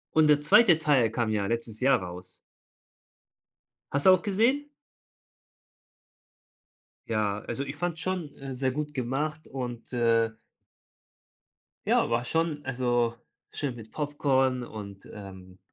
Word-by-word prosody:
Und 155 -1 +5
der 150 -1 +5
2. 165 +3 +6
Teil 140 -8 +3
kam 115 -1 -1
ja 105 -2 0
letztes 115 -1 -3
Jahr 135 -3 +4
raus. 90 +1 -9 1.5
Hast 140 0 0
du - - +10
auch 185 -1 +5
gesehen? 230 +8 +2 2.4
Ja, 105 -2 0
also, 120 +6 -4
ich 140 +1 -6
fand 170 +1 -2
schon, 170 -4 -3
äh, 135 -1 -7
sehr 130 +1 0
gut 150 +2 -4
gemacht 145 +5 -3
und, 125 -3 -6
äh 115 -2 +2 1.5
ja - - +3
war 115 +1 +1
schon 160 +1 -1
also, 120 -2 0 0.3
schön 140 -4 -3
mit 115 -2 -11
Popcorn 135 -3 +1
und, 100 -4 -9
ähm, 95 -2 -11
130 Hz, 125 wpm, -28 LUFS, 115-150 Hz, 2.4 s, du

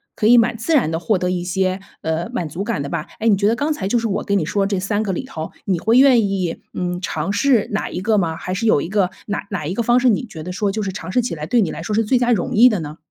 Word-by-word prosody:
可 215 - +1
以 240 +1 +7
蛮 235 0 +3
自 230 +9 -2
然 240 - +2
地 165 - -1
获 200 +4 +1
得 180 0 -1
一 180 -1 -2
些， 185 +1 -1 0.2
呃， 160 +2 -2
满 170 - -2
足 170 +6 -5
感 210 -9 -2
的 140 - -5
吧。 155 - -4
哎， 225 - 0
你 210 - +5
觉 200 +1 +1
得 225 - +3
刚 295 +5 0
才 195 -9 -4
就 240 - +1
是 230 0 0
我 200 - -2
跟 200 0 +1
你 160 - 0
说 195 +3 0
这 200 -2 -1
3 205 +2 -1
个 205 -3 -1
里 - - -4
头， 160 0 -6
你 185 -3 0
会 225 +7 +3
愿 255 -6 +6
意， 185 -4 -2
嗯， 180 0 -3
尝 195 +1 -2
试 240 0 +2
哪 210 - -2
一 180 - -4
个 210 +1 +2
吗？ 165 -3 -1
还 180 - -5
是 225 +5 -1
有 145 -9 +4
一 - - -4
个 195 -2 +1 0.2
哪 205 -1 -4
哪 190 -7 -4
一 175 - -2
个 235 - -1
方 240 +2 +3
式， 250 0 +3
你 215 - +1
觉 160 -7 -9
得 180 - -6
说 200 +2 -1
就 215 +1 -3
是 195 - -2
尝 185 -1 -7
试 250 - +2
起 245 - -3
来， 150 -1 -5
对 240 +5 +2
你 175 - 0
来 160 - -6
说 210 +5 -3
是 225 - +2
最 245 +3 +2
佳 245 0 +2
容 200 -7 0
易 245 +4 +7
的 210 - -1
呢？ 155 +1 -7
200 Hz, 345 characters per minute, -20 LUFS, 180-225 Hz, 0.2 s, 以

